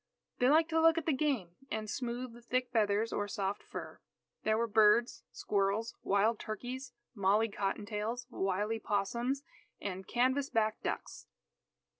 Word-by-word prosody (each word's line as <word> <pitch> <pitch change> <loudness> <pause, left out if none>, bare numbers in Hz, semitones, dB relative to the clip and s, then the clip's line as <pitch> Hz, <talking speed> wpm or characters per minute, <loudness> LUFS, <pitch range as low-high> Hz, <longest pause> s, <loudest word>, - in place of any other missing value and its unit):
They 250 - +5
liked 320 +3 +5
to 320 0 +3
look 325 0 +6
at 325 - -1
the 320 - +2
game, 260 - -1
and 215 0 -3
smooth 240 +2 -3
the 240 - -13
thick 250 +1 -1
feathers 215 -1 +2
or 205 - -1
soft 200 0 -2
fur. - - -8 0.4
There 215 0 +2
were 235 - +2
birds, 220 +2 +4
squirrels, 205 +3 0
wild 210 +3 +2
turkeys, 250 +5 -5 0.2
molly 210 +1 +3
cotton 200 +1 -2
tails, 225 +3 -3
wily 205 +2 -1
'possums, 235 +7 -1 0.4
and 190 -1 -5
canvas 260 +3 +2
back 220 -1 +1
ducks. - - -4
225 Hz, 150 wpm, -33 LUFS, 205-250 Hz, 0.4 s, look